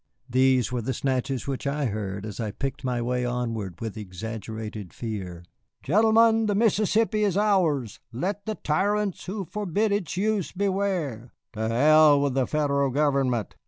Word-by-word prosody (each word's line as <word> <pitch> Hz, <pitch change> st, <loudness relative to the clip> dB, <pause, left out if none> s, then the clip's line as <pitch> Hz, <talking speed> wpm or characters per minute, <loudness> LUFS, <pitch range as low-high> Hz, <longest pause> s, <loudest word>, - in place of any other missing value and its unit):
These 130 Hz, -2 st, +3 dB
were 125 Hz, -1 st, -1 dB
the 130 Hz, +3 st, -3 dB
snatches 130 Hz, -2 st, -1 dB
which 140 Hz, +1 st, -3 dB
I 145 Hz, +1 st, -1 dB
heard 100 Hz, -3 st, -3 dB
as 105 Hz, +1 st, -7 dB
I 110 Hz, -2 st, -2 dB
picked 135 Hz, +7 st, -5 dB
my 125 Hz, -2 st, -1 dB
way 125 Hz, +1 st, -1 dB
onward 115 Hz, -7 st, -3 dB
with 110 Hz, -3 st, -5 dB
exaggerated 110 Hz, 0 st, -6 dB
fear: 95 Hz, -7 st, -6 dB, 0.4 s
"Gentlemen, 225 Hz, -, +4 dB
the 205 Hz, -, +1 dB
Mississippi 215 Hz, 0 st, +2 dB
is 200 Hz, -3 st, +1 dB
ours, 170 Hz, -, +1 dB
let 200 Hz, -, -3 dB
the 215 Hz, -, -1 dB
tyrants 200 Hz, +5 st, 0 dB
who 195 Hz, +1 st, -4 dB
forbid 210 Hz, +3 st, -1 dB
its 200 Hz, -4 st, -2 dB
use 205 Hz, -2 st, 0 dB
beware!" 185 Hz, -, -2 dB, 0.2 s
"To 110 Hz, 0 st, -2 dB
hell 150 Hz, +4 st, +6 dB
with 140 Hz, -2 st, 0 dB
the 130 Hz, -1 st, +1 dB
Federal 140 Hz, -2 st, +1 dB
government!" 135 Hz, -5 st, +1 dB
140 Hz, 155 wpm, -26 LUFS, -, 0.4 s, hell